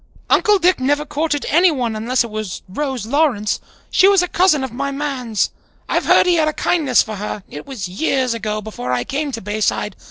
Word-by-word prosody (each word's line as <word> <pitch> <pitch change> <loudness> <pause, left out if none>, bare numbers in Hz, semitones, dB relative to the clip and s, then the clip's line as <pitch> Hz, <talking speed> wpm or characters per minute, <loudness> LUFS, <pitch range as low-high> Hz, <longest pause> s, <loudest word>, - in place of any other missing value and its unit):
Uncle 420 -2 +4
Dick 365 -2 +2
never 290 +3 +1
courted 295 0 -2
anyone, 295 -9 +2
unless 235 +3 +1
it 235 - -8
was 215 -4 -5
Rose 260 +3 -3
Lawrence. 245 -5 +1 0.3
She 370 +1 +5
was 395 -2 +5
a - - -1
cousin 350 -6 +3
of 265 - -4
my 280 +4 -3
man's. 270 -6 -2 0.4
I've - - 0
heard - - +5
he 355 -1 +3
had 310 -1 +2
a 310 - 0
kindness 295 -9 +2
for 215 -1 -6
her; 210 0 -5
it 150 - -8
was 250 -9 -5
years 255 - 0
ago, 215 -1 -3
before 125 - -5
I 125 -1 0
came 285 - -3
to 230 - -4
Bayside. 210 -1 -1
260 Hz, 200 wpm, -19 LUFS, 215-300 Hz, 0.4 s, She